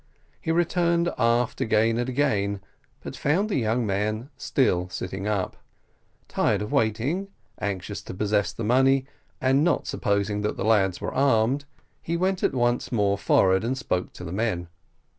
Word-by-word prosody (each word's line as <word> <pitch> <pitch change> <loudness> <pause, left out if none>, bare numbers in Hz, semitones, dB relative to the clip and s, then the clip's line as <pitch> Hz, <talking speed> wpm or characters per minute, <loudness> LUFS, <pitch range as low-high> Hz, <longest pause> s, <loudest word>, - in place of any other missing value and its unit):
He 160 - -1
returned 170 0 +1
aft 115 0 +1
again 110 +1 +2
and 120 +1 -1
again; 105 -8 0 0.4
but - - -6
found 180 +9 +1
the 200 - 0
young 115 +1 0
man 110 +6 -2
still 90 -9 +1
sitting 95 +2 -5
up. 100 -3 -1 0.7
Tired - - +1
of 105 - -6
waiting, 120 - 0 0.3
anxious 100 0 -3
to - - -7
possess 105 -2 +1
the 115 - -6
money, 130 +4 +3 0.3
and 135 +2 +3 0.2
supposing 100 -2 -1
that 105 - -2
the 95 - -2
lads 95 -5 +2
were - - -3
armed, 135 +1 +2 0.4
he 170 +1 -2
went 185 +1 0
once 120 -1 0
more 100 -4 +2
forward 95 -1 +3
and 125 +3 -1
spoke 90 -9 -2
to - - -10
the 85 0 -6
men. 95 -5 -1
110 Hz, 155 wpm, -25 LUFS, 100-135 Hz, 0.7 s, money